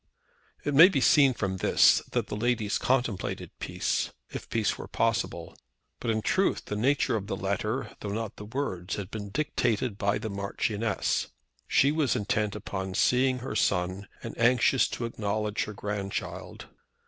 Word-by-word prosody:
It 145 Hz, -, 0 dB
may 165 Hz, +7 st, +9 dB
be 145 Hz, -, +1 dB
seen 135 Hz, 0 st, +5 dB
from 95 Hz, -4 st, -2 dB
this -, -, +5 dB
that -, -, +1 dB
the -, -, -5 dB
ladies 110 Hz, -1 st, 0 dB
contemplated 125 Hz, -6 st, -1 dB
peace, -, -, -1 dB, 0.2 s
if -, -, -7 dB
peace 110 Hz, -3 st, +1 dB
were -, -, -8 dB
possible. -, -, -1 dB, 0.4 s
But 120 Hz, -, -3 dB
in 110 Hz, -1 st, 0 dB
truth 195 Hz, -, +1 dB
the 105 Hz, -, -4 dB
nature 130 Hz, +4 st, +2 dB
of 100 Hz, -2 st, -3 dB
the 100 Hz, -, -2 dB
letter, 105 Hz, +6 st, -2 dB
though 105 Hz, -, -5 dB
not 110 Hz, +1 st, -4 dB
the 105 Hz, -, -8 dB
words, 105 Hz, -7 st, -3 dB
had 100 Hz, 0 st, -6 dB
been 105 Hz, -2 st, -5 dB
dictated 115 Hz, -5 st, -1 dB
by 100 Hz, 0 st, +1 dB
the 110 Hz, -, -5 dB
Marchioness. 100 Hz, +2 st, -1 dB, 0.4 s
She 140 Hz, -, +4 dB
was 150 Hz, -5 st, +1 dB
intent 105 Hz, -2 st, 0 dB
upon 95 Hz, -2 st, -5 dB
seeing 130 Hz, +4 st, +3 dB
her 110 Hz, -, -4 dB
son, 95 Hz, 0 st, 0 dB, 0.2 s
and -, -, -6 dB
anxious 125 Hz, +1 st, +4 dB
to 120 Hz, -, -4 dB
acknowledge 105 Hz, -1 st, -2 dB
her 105 Hz, -, -7 dB
grandchild. 100 Hz, -1 st, -5 dB
110 Hz, 160 wpm, -28 LUFS, 100-125 Hz, 0.4 s, may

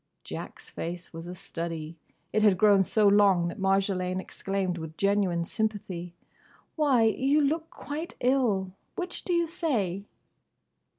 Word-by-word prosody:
Jack's -, -, -8 dB
face 175 Hz, +1 st, -6 dB
was 165 Hz, +1 st, -7 dB
a 180 Hz, -, -6 dB
study. 165 Hz, -2 st, -5 dB, 0.4 s
It 215 Hz, -, +3 dB
had 205 Hz, -3 st, +5 dB
grown 205 Hz, -1 st, +6 dB
so 210 Hz, +2 st, +3 dB
long 200 Hz, -4 st, +5 dB
that 205 Hz, -, -8 dB
Marjolaine 190 Hz, -1 st, +1 dB
exclaimed 190 Hz, -2 st, -3 dB
with 160 Hz, 0 st, -8 dB
genuine 195 Hz, -4 st, +2 dB
sympathy, 185 Hz, -5 st, -3 dB, 0.6 s
"Why, 280 Hz, -7 st, +4 dB
you 265 Hz, +7 st, +3 dB
look 315 Hz, +3 st, 0 dB
quite 310 Hz, +4 st, -6 dB
ill! 240 Hz, -8 st, +2 dB, 0.2 s
Which 360 Hz, -1 st, -4 dB
do -, -, -3 dB
you 340 Hz, -1 st, +3 dB
say?" 235 Hz, -, -1 dB
195 Hz, 135 wpm, -28 LUFS, 180-250 Hz, 0.6 s, grown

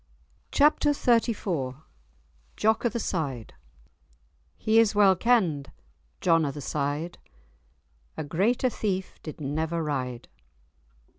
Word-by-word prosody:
*Chapter 295 Hz, 0 st, +4 dB
XXXIV* 210 Hz, -, 0 dB, 0.8 s
*Jock 220 Hz, +3 st, +2 dB
o' -, -, 0 dB
the 235 Hz, -, -3 dB
Side* 135 Hz, -, -3 dB, 1.0 s
"He 220 Hz, +1 st, +3 dB
is 220 Hz, -2 st, +3 dB
well 200 Hz, -2 st, +6 dB
kend, 180 Hz, -, +1 dB, 0.5 s
John 165 Hz, -3 st, +4 dB
of 140 Hz, -2 st, -2 dB
the -, -, -6 dB
Syde, 145 Hz, +4 st, -3 dB, 1.0 s
A 155 Hz, -, -2 dB
greater 215 Hz, -, +1 dB
thief 190 Hz, -4 st, -3 dB
did 155 Hz, -, -8 dB
never 160 Hz, +3 st, -2 dB
ryde." 130 Hz, -5 st, -3 dB
170 Hz, 105 wpm, -27 LUFS, 145-220 Hz, 1.0 s, well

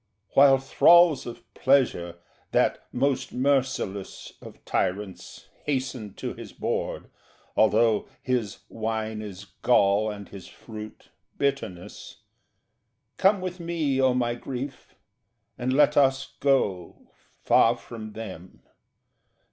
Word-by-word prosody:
While 135 Hz, -1 st, +6 dB
thralls 165 Hz, +3 st, +5 dB
of 120 Hz, -, -8 dB
Pleasure, 125 Hz, -11 st, +2 dB, 0.4 s
that -, -, +2 dB
most 135 Hz, +1 st, 0 dB
merciless 130 Hz, -7 st, -1 dB
Of -, -, -13 dB
tyrants, 95 Hz, +1 st, -3 dB, 0.2 s
hasten 130 Hz, -7 st, -3 dB
to -, -, -5 dB
his -, -, -10 dB
board -, -, -3 dB, 0.4 s
(although 110 Hz, 0 st, +3 dB
His 120 Hz, -6 st, -2 dB
wine 110 Hz, -1 st, -3 dB
is 100 Hz, -1 st, -8 dB, 0.2 s
gall, 105 Hz, -3 st, +3 dB
and 100 Hz, -1 st, -7 dB
his 95 Hz, -2 st, -11 dB
fruit, 110 Hz, -1 st, -11 dB, 0.3 s
bitterness), 135 Hz, -11 st, -4 dB, 0.9 s
Come 195 Hz, 0 st, +3 dB
with 185 Hz, 0 st, -5 dB
me, 160 Hz, -6 st, -1 dB
O 130 Hz, -1 st, +3 dB
my 120 Hz, -1 st, 0 dB
Grief, 130 Hz, +2 st, -7 dB, 0.6 s
and 125 Hz, +1 st, -2 dB
let 145 Hz, +2 st, +4 dB
us 135 Hz, -1 st, +2 dB
go 100 Hz, -11 st, 0 dB, 0.3 s
Far 115 Hz, +1 st, +4 dB
from 110 Hz, -2 st, -9 dB
them. 95 Hz, -5 st, -9 dB
120 Hz, 110 wpm, -26 LUFS, 105-135 Hz, 0.9 s, While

